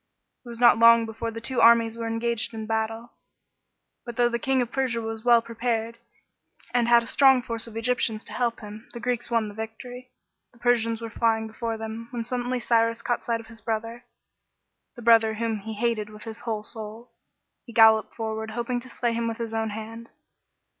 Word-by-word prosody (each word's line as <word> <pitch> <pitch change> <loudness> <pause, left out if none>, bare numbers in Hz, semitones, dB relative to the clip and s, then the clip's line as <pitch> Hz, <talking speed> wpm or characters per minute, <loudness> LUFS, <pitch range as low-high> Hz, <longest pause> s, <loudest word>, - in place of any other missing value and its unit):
It 245 - -12
was 235 -1 -7
not 235 -2 +6
long 230 0 +7
before 225 +1 -5
the 230 0 -6
two 255 +2 -1
armies 230 -1 +6
were 230 0 -4
engaged 230 0 -1
in 220 -1 -5
battle. 225 +1 -3 0.9
But 240 -1 -8
though 240 0 +3
the 235 0 -2
King 265 +2 +1
of 240 - -8
Persia 260 -3 0
was 225 -1 -5
well 235 -1 +5
prepared, 230 0 -3 0.7
and 240 -1 +2
had 235 0 +6
a - - -10
strong 265 -1 +5
force 230 -1 -4
of 225 -1 -9
Egyptians 230 -2 -1
to - - -12
help 240 -2 -1
him, 210 +1 -10
the 240 - -6
Greeks 240 0 -2
won 230 -2 +1
the 205 - -8
victory. 245 +4 -8 0.4
The - - -21
Persians 230 -1 +1
were 225 - -6
flying 225 -1 +1
before 225 +1 -4
them, 220 +1 -6
when 240 -2 -4
suddenly 245 +1 -2
Cyrus 230 0 +1
caught 240 -1 -1
sight 230 -1 -2
of - - -16
his 225 -1 -13
brother, 230 +2 -4 0.9
the 240 - -10
brother 225 -1 +5
whom 225 -1 -2
he 220 +2 -7
hated 215 -1 -1
with 210 0 -11
his 225 -1 -7
whole 220 -3 -3
soul. 220 +1 -8 0.6
He - - -9
galloped 220 -1 +5
forward, 220 -1 -4
hoping 240 +2 -2
to 255 +1 -12
slay 235 -1 -1
him 230 0 -1
with 225 0 -3
his 230 -1 -5
own 225 0 -1
hand. 225 +2 -8
230 Hz, 200 wpm, -25 LUFS, 220-235 Hz, 0.9 s, long